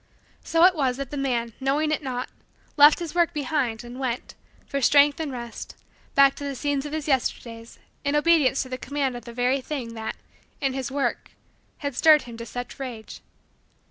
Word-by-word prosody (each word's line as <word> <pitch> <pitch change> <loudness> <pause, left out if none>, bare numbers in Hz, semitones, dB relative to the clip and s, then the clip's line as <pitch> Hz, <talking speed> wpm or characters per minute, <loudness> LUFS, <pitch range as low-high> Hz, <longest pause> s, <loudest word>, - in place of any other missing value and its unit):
So 330 0 +2
it 370 - +6
was 265 -6 0
that 275 -2 -5
the - - -4
man, 240 -4 -1
knowing 285 +3 +1
it 310 - 0
not, 255 -3 -4 0.5
left 295 +1 +8
his 340 -3 -5
work 345 -1 +2
behind 265 -6 -1
and 240 +2 -9
went, 255 -2 -3 0.3
for 280 - -3
strength 285 +3 +5
and 310 -3 -3
rest, 235 -2 -7 0.4
back 275 0 +6
to - - -7
the 280 -1 -3
scenes 285 +1 -1
of - - -8
his 310 -1 -4
Yesterdays 235 -4 -2 0.3
in 285 +1 0
obedience 295 -4 +3
to 260 - -11
the 255 0 -5
command 275 -1 -2
of 240 -2 -8
the 235 - -8
very 250 +3 +1
thing 255 -5 -5
that, 220 -1 -5 0.4
in 270 -2 0
his 265 -2 -3
work, 275 +1 -2 0.4
had 285 -3 -4
stirred 310 +2 +6
him 235 -1 -10
to 230 0 -7
such 245 +5 -7
rage. 240 -5 -7
270 Hz, 195 wpm, -25 LUFS, 245-290 Hz, 0.5 s, left